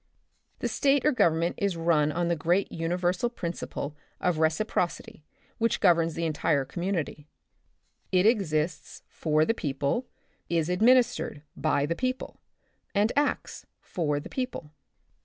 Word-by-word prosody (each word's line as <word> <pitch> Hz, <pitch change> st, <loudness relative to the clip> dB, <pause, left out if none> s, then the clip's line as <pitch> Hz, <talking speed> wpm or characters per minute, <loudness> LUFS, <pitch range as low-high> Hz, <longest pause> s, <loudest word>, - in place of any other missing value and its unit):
The -, -, 0 dB
state 280 Hz, 0 st, +2 dB
or 300 Hz, -, +5 dB
Government 170 Hz, -, +2 dB
is 200 Hz, -4 st, 0 dB
run 160 Hz, -3 st, +2 dB
on 170 Hz, +2 st, -1 dB
the 170 Hz, -, +1 dB
great 175 Hz, +5 st, +1 dB
uni 165 Hz, +1 st, -2 dB
versal 180 Hz, +6 st, 0 dB
principle 165 Hz, -4 st, -4 dB, 0.2 s
of 175 Hz, -3 st, 0 dB
reciprocity 160 Hz, -1 st, -1 dB, 0.4 s
which 230 Hz, 0 st, +1 dB
governs 165 Hz, -4 st, +3 dB
the 165 Hz, -, -1 dB
entire 150 Hz, -3 st, +1 dB
community. 170 Hz, -2 st, -3 dB, 0.8 s
It 185 Hz, +1 st, +3 dB
exists 175 Hz, -8 st, 0 dB
for 155 Hz, -1 st, +1 dB
the 225 Hz, -, +2 dB
people, 145 Hz, -, -2 dB, 0.4 s
is 165 Hz, -1 st, +1 dB
administered 235 Hz, -, +3 dB
by 145 Hz, 0 st, +1 dB
the 160 Hz, -, 0 dB
people, 255 Hz, +3 st, -3 dB, 0.6 s
and 210 Hz, +3 st, +3 dB
acts 290 Hz, +1 st, -1 dB
for 150 Hz, -5 st, -2 dB
the -, -, -8 dB
people. 250 Hz, -, -4 dB
170 Hz, 135 wpm, -27 LUFS, 155-205 Hz, 0.8 s, or